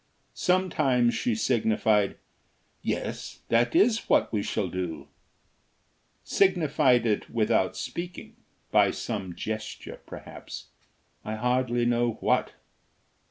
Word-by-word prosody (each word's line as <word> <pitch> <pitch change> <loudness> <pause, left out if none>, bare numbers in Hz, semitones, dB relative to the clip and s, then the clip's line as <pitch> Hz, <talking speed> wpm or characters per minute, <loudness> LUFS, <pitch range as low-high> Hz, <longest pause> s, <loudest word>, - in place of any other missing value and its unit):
Sometimes 150 -10 +2
she 245 -2 0
signified: 110 - +2 0.6
"Yes, - - -4
that 115 +1 +2
is 230 0 +3
what - - +3
we 105 - +1
shall 100 -1 -1
do;" 90 -2 -4 1.2
signified 155 -10 +3
it 105 -3 0
without 110 -5 +1
speaking 170 - -6 0.4
by - - +5
some 95 -6 -4
gesture 110 -1 -6
perhaps, - - -9 0.5
I 110 - -4
hardly 120 +1 +1
know 120 -1 +2
what. - - 0
120 Hz, 100 wpm, -27 LUFS, 110-140 Hz, 1.2 s, by